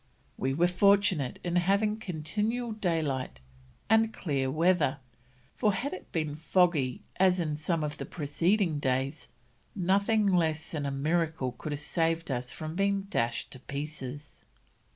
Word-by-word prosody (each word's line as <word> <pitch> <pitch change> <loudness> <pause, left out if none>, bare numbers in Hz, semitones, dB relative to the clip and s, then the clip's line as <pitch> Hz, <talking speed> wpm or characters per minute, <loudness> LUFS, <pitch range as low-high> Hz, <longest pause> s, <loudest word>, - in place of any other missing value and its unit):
"We 135 +1 -1
were 170 +4 +4
fortunate 185 -6 +3
in 175 0 0
having 200 +4 +2
continual 215 +6 -2
daylight, 160 - -1 0.5
and 220 +1 +4
clear 140 -10 -1
weather, 160 -2 +2 0.6
for 210 -4 +2
had 250 +9 -2
it 185 - -9
been 155 -3 -1
foggy 160 -5 +1
as 185 -1 +4
on 155 -3 -1
some 155 +1 -1
of 150 -1 -4
the - - -4
preceding 165 +2 +1
days, 135 +2 -1 0.5
nothing 200 +3 +2
less 165 -5 +1
than 145 -3 -2
a - - -1
miracle 155 -1 0
could 135 +5 -7
have 145 0 -3
saved 165 0 0
us 125 -1 -2
from 155 0 -6
being 200 +1 +1
dashed 115 0 -1
to 130 - -9
pieces." 145 0 -7
165 Hz, 145 wpm, -29 LUFS, 145-190 Hz, 0.6 s, were